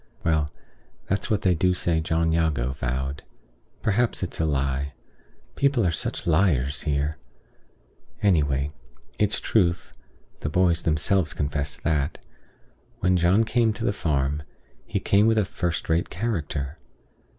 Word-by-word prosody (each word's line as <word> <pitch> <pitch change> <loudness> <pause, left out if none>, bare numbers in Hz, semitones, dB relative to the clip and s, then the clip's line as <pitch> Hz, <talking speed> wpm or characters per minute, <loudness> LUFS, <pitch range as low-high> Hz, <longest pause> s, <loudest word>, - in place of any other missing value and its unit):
Well, 80 -2 +1 0.6
that's 100 +4 -1
what 105 -3 +1
they 95 - +4
do 90 +2 +2
say 85 -2 +1
John 80 +1 +1
Jago 80 -7 +1
vowed. 65 +2 -3 0.6
Perhaps 110 0 +1
it's 90 - -4
a 80 - +2
lie. 70 -1 -1 0.6
People 135 -6 +2
are 85 - +3
such - - -3
liars 75 -5 +2
here! 75 0 -1 1.1
Anyway, 75 -7 +2 0.5
it's 105 0 +2
truth 90 -5 +1 0.5
(the 75 - -2
boys 85 0 +3
themselves 80 +2 +1
confess 75 0 -2
that), 75 -2 -1 0.8
when 90 0 +2
John 90 +5 +4
came 115 0 +2
to 115 +2 -4
the - - +2
farm, 75 -4 0 0.5
he - - -1
came 100 +2 +3
with 115 0 +3
a 105 - +3
first 90 -2 -2
rate 80 +1 +1
character. 80 - -3
80 Hz, 135 wpm, -25 LUFS, 75-95 Hz, 1.1 s, they